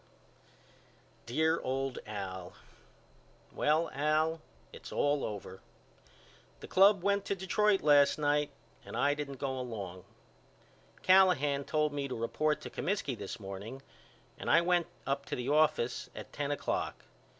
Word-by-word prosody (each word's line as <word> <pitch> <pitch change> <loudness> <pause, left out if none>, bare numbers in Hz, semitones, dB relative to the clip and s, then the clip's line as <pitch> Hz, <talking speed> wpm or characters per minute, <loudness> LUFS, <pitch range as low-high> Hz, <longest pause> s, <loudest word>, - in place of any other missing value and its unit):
DEAR 160 +7 +1
OLD 135 0 -2
AL: 95 -3 -6 1.0
Well 155 +2 +1
Al 155 +3 +1 0.3
it's - - -10
all 145 0 +1
over. 95 -2 -6 1.0
The - - -9
club 195 0 +5
went 200 0 +2
to 200 - -1
Detroit 195 +2 +2
last 145 -1 +5
night 150 0 +1 0.3
and - - -7
I 145 +1 +3
didn't 145 -2 -5
go 135 -2 -2
along. 100 -7 -6 1.0
Callahan 150 -7 +4
told 150 -1 0
me 140 -1 -2
to 130 - -4
report 150 +7 0
to - - -8
Comiskey 185 -9 -2
this 110 +1 -7
morning 100 +7 -8 0.6
and - - -4
I 165 - +6
went 175 -1 +2 0.2
up 140 0 -1
to - - -2
the 125 +2 -3
office 150 -5 +2
at - - -9
ten 145 -1 -2
o'clock. 145 - -2
145 Hz, 135 wpm, -32 LUFS, 125-160 Hz, 1.0 s, I